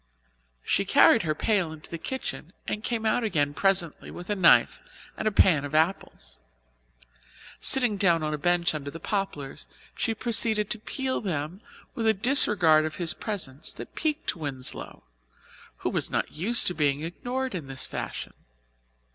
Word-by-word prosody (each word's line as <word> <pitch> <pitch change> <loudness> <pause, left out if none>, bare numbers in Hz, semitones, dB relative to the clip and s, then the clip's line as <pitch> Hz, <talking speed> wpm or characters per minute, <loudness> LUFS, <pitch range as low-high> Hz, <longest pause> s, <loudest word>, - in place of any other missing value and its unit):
She - - +1
carried - - +5
her 155 -2 -1
pail 190 -3 0
into 155 -1 -10
the 170 - -5
kitchen 190 - -5
and 210 - -3
came 230 -2 -2
out 225 +2 +1
again 145 -9 0
presently 185 -1 0
with 180 +4 -7
a - - +1
knife 185 -4 +4 0.3
and - - -2
a - - +2
pan 175 -7 +4
of 145 +1 -5
apples. 155 - -1 1.2
Sitting 245 -6 +2
down 170 -5 +3
on 155 0 -1
a - - -1
bench 175 0 +1
under 145 -2 -5
the 165 - -9
poplars 150 - -4 0.3
she 225 - -1
proceeded 220 -2 +2
to 215 - +3
peel 260 +4 -3
them 170 0 -4 0.3
with 225 -1 -2
a 220 - +4
disregard 195 - +5
of 155 0 -4
his 170 -3 +1
presence 165 - -4
that - - -10
piqued 310 - -2
Winslow, 140 -6 -5 0.7
who - - -2
was - - +2
not - - -2
used 220 +9 +2
to 180 - 0
being 145 -2 0
ignored 250 +10 -4
in 160 -7 -5
this 135 -1 -4
fashion. - - -6
175 Hz, 165 wpm, -26 LUFS, 155-215 Hz, 1.2 s, carried